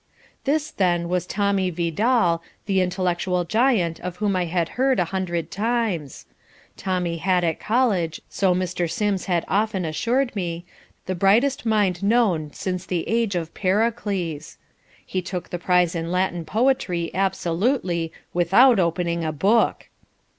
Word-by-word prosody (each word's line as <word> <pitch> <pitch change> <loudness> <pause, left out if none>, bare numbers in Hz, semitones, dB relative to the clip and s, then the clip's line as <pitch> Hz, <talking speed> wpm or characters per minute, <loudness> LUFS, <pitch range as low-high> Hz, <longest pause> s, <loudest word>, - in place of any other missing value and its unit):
This 305 +2 0
then 175 -3 0
was 180 0 -1
Tommy 200 -1 +1
Vidal, 175 +2 +1 0.2
the 195 -2 +2
intellectual 180 0 0
giant 210 -5 +1
of 180 0 -5
whom 205 0 0
I 180 -1 +1
had 170 0 -1
heard 260 -1 +1
a 180 - +2
hundred 175 -3 -2
times. 210 - -2 0.5
Tommy 180 -3 -2
had, 180 +1 +1
at 165 -2 0
college, 215 -9 +1
so 190 -2 +1
Mr. 180 -1 -1
Sims 200 +2 -1
had 175 -3 0
often 205 -2 0
assured 240 - 0
me, 175 -3 -3 0.4
the 185 - -2
brightest 225 +8 +2
mind 205 -5 +1
known 200 -8 +2
since 180 +2 -4
the 175 -3 -2
age 225 -4 0
of 165 -2 -3
Pericles. 195 -6 -1 0.5
He 185 - -2
took 180 0 -6
the 175 - -3
prize 180 -1 +2
in 165 0 -3
Latin 180 -2 0
poetry 210 -7 0
absolutely 180 -1 0 0.2
"without 195 +8 +5
opening 170 -1 0
a 155 - -1
book." 200 +9 +2
185 Hz, 140 wpm, -23 LUFS, 170-210 Hz, 0.5 s, without